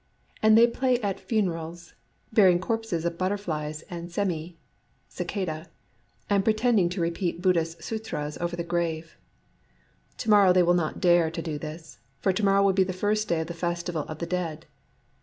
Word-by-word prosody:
And 220 0 +6
they 230 - +8
play 250 +1 +1
at 200 -3 -2
funerals, 170 -5 -3 0.2
— - - -32
burying 185 -5 +6
corpses 215 -3 -2
of 170 0 -2
butterflies 165 -6 -2
and 175 0 -7
semi 170 -3 -2 0.5
(cicadse), 165 -4 -4 0.6
and 200 -1 +2
pretending 215 -3 +3
to 180 +2 -4
repeat 170 +1 -1
Buddhist 165 -3 0
sutras 215 -10 -4
over 175 0 -2
the 170 - -3
grave. 170 -1 -2 1.0
To 225 - -4
morrow 200 -3 +7
they 180 -1 +5
will 175 +1 +4
not 170 -3 -1
dare 175 -3 +4
to 165 +1 -5
do 155 -3 -4
this; 155 +1 -9 0.2
for 190 - +1
to 210 +3 -2
morrow 195 0 +4
will 195 -1 +4
be 190 0 +4
the 185 0 -3
first 210 +3 0
day 170 -3 +1
of - - -3
the 170 - -6
festival 170 -1 -2
of 155 - -6
the 170 - -3
Dead. 170 -3 -3
175 Hz, 175 wpm, -26 LUFS, 165-200 Hz, 1.0 s, they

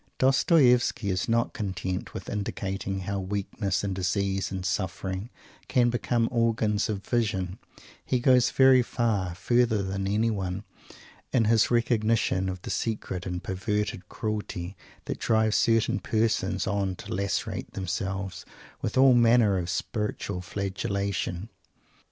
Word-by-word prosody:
Dostoievsky 130 - +4
is 90 +3 -1
not 115 +1 +1
content 95 -3 -3
with - - -6
indicating 95 -1 -3
how 100 +1 -3
weakness 100 0 -2
and 100 -2 -1
disease 95 +1 -1
and 95 -1 -4
suffering 95 +2 -2 0.4
can 120 -1 +3
become 120 -1 +1
organs 110 -3 +1
of 100 -2 -3
vision; 105 -6 -1 0.4
he 130 - 0
goes 125 -1 +4
very 130 -1 +6
far 105 -8 -1
further 115 +1 +2
than 95 0 -2
anyone 100 -3 -1 0.7
in 120 -4 +3
his 110 0 +4
recognition 115 -5 +1
of 95 -1 -6
the - - -4
secret 95 -5 -3
and 90 -1 -4
perverted 105 0 -2
cruelty 105 -5 -4 0.3
that - - -4
drives 110 -1 +2
certain 115 -1 +2
persons 110 0 0
on 100 -2 -1
to - - -7
lacerate 100 +1 -2
themselves 95 0 -3 0.4
with 110 - -2
all 130 0 +7
manner 115 -4 +4
of 85 0 -4
spiritual 105 -2 -3
flagellation. 100 0 -3
100 Hz, 125 wpm, -27 LUFS, 95-115 Hz, 0.7 s, all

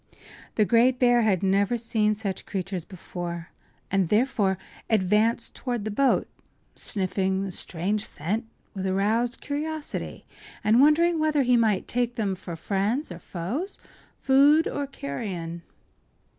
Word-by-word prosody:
The 215 - +4
great 245 +3 +4
bear 245 -1 +4
had 205 -5 +2
never 200 +4 +2
seen 220 -2 +1
such 200 -3 -4
creatures 190 -3 -3
before, 175 -3 -6 0.4
and 190 -3 +2
therefore 210 -4 +2 0.3
advanced 215 +2 +2
toward 240 -5 -3
the 215 - -2
boat, 270 +6 +2 0.5
sniffing 190 -1 -1
the 195 - -4
strange 190 +5 -2
scent 210 +10 -3 0.3
with 190 -1 -3
aroused 220 +6 0
curiosity 300 +1 -4 0.4
and 220 +4 +5
wondering 325 +3 +4
whether 305 -2 +2
he 250 -1 +4
might 220 -5 +2
take 245 0 -1
them 205 -4 0
for 180 -2 -7
friends 200 - -1
or 175 - -7
foes, 230 - -4 0.4
food 285 +4 +5
or 285 -1 -3
carrion. 170 - -5
215 Hz, 130 wpm, -26 LUFS, 190-245 Hz, 0.5 s, and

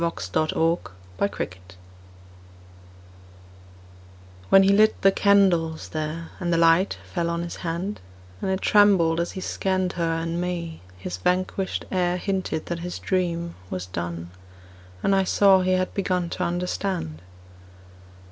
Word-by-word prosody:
THE 170 - +2
YOUNG 160 -1 -2 0.7
CHURCHWARDEN 95 - -4 2.7
WHEN 195 - +7
he 195 - +4
lit 215 +2 +4
the 195 - +7
candles 185 -6 +2
there, 155 +1 -4
And 175 -1 -1
the 165 - +3
light 165 +3 +4 0.2
fell 170 -2 0
on 170 0 -2
his 170 - -6
hand, 175 +4 -3 0.4
And - - -1
it 190 0 -1
trembled 190 -6 +4
as 170 - -2
he 185 - -6
scanned 185 -1 -1
Her 165 -1 0
and 165 +1 -2
me, 170 -2 -4 0.2
his 90 -1 -5
vanquished 185 - -1
air 180 -1 +1
Hinted 190 -4 -2
that 170 -1 -4
his 175 +1 -5
dream 170 -2 -1 0.2
was 90 -1 -4
done, 85 -1 -5 0.7
And 195 - +3
I 195 - +3
saw 190 0 +5
he 185 0 +1
had 185 0 0
begun 180 -3 -1
To - - -2
understand. 175 - -3
175 Hz, 140 wpm, -24 LUFS, 165-190 Hz, 2.7 s, WHEN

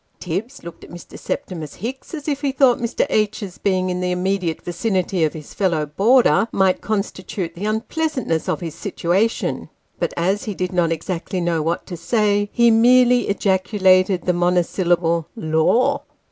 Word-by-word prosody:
Tibbs 200 - -5
looked 170 -1 -10
at - - -12
Mr. 175 0 -11
Septimus 170 - -5
Hicks, 260 - -6
as 300 -1 -8
if 285 -2 -1
he 280 -2 0
thought 265 -2 +3
Mr. 235 -1 0
H.'s 205 -3 -1
being 185 -2 0
in 180 0 -3
the 180 - -1
immediate 180 -2 -1
vicinity 185 -1 -1
of 155 - -2
his 155 -2 -10
fellow 170 -6 0
boarder 225 - +3
might 190 -1 +2
constitute 195 -4 -3
the 185 +4 -6
unpleasantness 225 - -2
of - - -1
his 165 -3 -5
situation; 195 +4 -1 0.3
but - - -1
as 190 +4 0
he 210 - -4
did 180 0 -3
not 175 -2 +1
exactly 170 +3 -3
know 170 -2 0
what 165 +2 -2
to 180 - -7
say, 205 +2 +1
he 235 -1 +4
merely 245 +1 +5
ejaculated 190 -1 +2
the 180 - +2
monosyllable 175 -1 +1
" - - -44
Lor 160 +6 +1
190 Hz, 165 wpm, -20 LUFS, 175-225 Hz, 0.3 s, merely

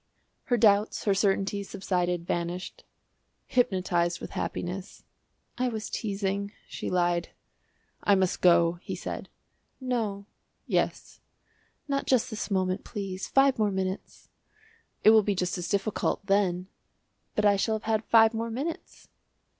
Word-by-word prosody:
Her 245 - +2
doubts, 210 -1 +3
her 200 - +3
certainties, 195 0 0
subsided, 180 -2 -1
vanished 175 +1 -3 0.6
hypnotised 180 -7 +1
with - - -8
happiness. 185 +3 -5 0.6
"I 255 - +2
was 220 -3 -4
teasing," 200 -1 -2
she - - -5
lied. 175 -1 +1 0.7
"I 200 - +5
must 190 -2 0
go," 170 -1 +4
he - - -5
said. - - -6 0.5
"No." 225 -6 -2 0.4
"Yes." - - -1 0.7
"Not 275 -1 -1
just 255 -1 +2
this 220 - -4
moment, 185 -1 0
please; 195 -2 -5
five 270 -2 +3
more 210 -1 +3
minutes." 190 0 -4 0.7
"It 215 - +8
will 220 -1 +7
be 205 -1 0
just 180 -1 -1
as 175 - -4
difficult 200 0 -1
then." 190 -3 +1 0.7
"But 210 - +1
I 205 -1 +6
shall 220 +3 +1
have 215 - -5
had 220 0 0
five 225 0 +6
more 230 +1 -2
minutes." 280 +9 -5
200 Hz, 135 wpm, -28 LUFS, 185-220 Hz, 0.7 s, It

